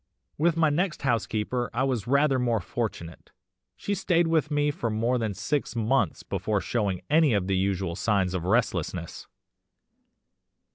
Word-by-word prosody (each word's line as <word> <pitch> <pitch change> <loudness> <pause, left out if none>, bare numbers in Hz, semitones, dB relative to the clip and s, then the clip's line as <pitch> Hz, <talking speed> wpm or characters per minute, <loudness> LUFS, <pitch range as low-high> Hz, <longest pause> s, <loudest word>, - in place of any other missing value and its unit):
"With 165 +2 +1
my 160 -2 +3
next 170 +2 -1
housekeeper 120 -1 -1
I 130 - +1
was 125 -6 -1
rather 140 0 +3
more 120 -3 +1
fortunate. 100 -8 -5 0.5
She 200 - -3
stayed 175 -3 +2
with 160 -2 +1
me 145 -1 +1
for 120 -5 -3
more 115 +3 0
than 110 -4 -2
six 145 +2 -2
months 115 +4 0
before 100 +2 -1
showing 100 -4 -2
any 150 -3 +4
of 100 -3 +1
the 95 0 0
usual 95 -2 -1
signs 95 -2 +1
of 90 -3 -2
restlessness. 90 -5 -1
120 Hz, 150 wpm, -26 LUFS, 100-145 Hz, 0.5 s, any